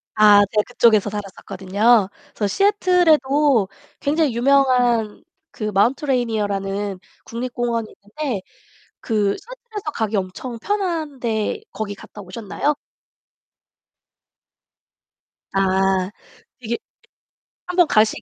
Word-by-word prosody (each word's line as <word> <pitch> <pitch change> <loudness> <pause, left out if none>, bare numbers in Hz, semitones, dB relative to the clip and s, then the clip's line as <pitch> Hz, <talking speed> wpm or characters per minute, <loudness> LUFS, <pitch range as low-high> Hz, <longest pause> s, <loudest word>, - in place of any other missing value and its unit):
아 210 -1 +7
제가 210 -1 +2
그쪽에서 225 -4 +3
살았었거든요. 200 +1 +1 0.3
그래서 205 - 0
시애틀에도 300 - +3 0.3
굉장히 290 -4 +1
유명한 245 -4 +2 0.3
그 215 - -5
마운트 220 - +1
레이니어라는 205 -6 -1 0.3
국립공원이 235 -1 -3
있는데 210 +1 -5 0.6
그 210 -3 0
시에틀에서 440 -7 -8
가기 220 -1 -1
엄청 200 +6 -4
편한데 310 - -2
거기 205 -2 -4
갔다 210 - -12
오셨나요? 215 +9 -2 2.8
아. 190 0 +2 0.5
이게 235 -1 -3 0.9
1 360 0 -5
번 350 -3 +5
가시게 215 0 +2
230 Hz, 240 characters per minute, -21 LUFS, 205-280 Hz, 2.8 s, 아